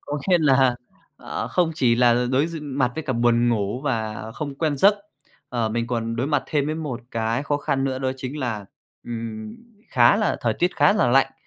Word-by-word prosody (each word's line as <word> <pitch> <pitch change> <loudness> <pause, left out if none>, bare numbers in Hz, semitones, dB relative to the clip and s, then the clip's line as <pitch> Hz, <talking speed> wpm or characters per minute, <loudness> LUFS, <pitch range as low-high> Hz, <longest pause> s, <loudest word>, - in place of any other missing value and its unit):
có 145 0 -5
nghĩa 180 -2 +5
là, 135 -4 +4 0.4
à, - - -5
không 175 -3 +1
chỉ 120 -5 +3
là 120 0 +3
đối 135 +4 +3
d 165 -1 -6
mặt 135 -3 0
với 160 - -5
cả 130 - -1
buồn 120 0 +2
ngủ 110 +1 -1
và 110 -5 -3
không 145 +2 -5
quen 150 0 -1
giấc, 200 +9 +5 0.5
ờ, 115 -3 -1
mình 115 +1 -2
còn 115 -1 -2
đối 125 +3 -1
mặt 145 -2 +1
thêm 145 -2 0
với 155 - -1
một 150 -7 -4
cái 115 +3 -1
khó 145 0 0
khăn 135 -2 -1
nữa 130 -1 -1
đó 130 0 -1
chính 130 +3 -6
là, 115 -7 -3 0.4
ừm, 110 -2 -6 0.3
khá 120 +7 +5
là 210 -3 0
thời 115 -2 0
tiết 175 +8 -1
khá 200 - +5
là 170 - +2
lạnh. 135 +2 +3
130 Hz, 215 wpm, -23 LUFS, 115-145 Hz, 0.5 s, nghĩa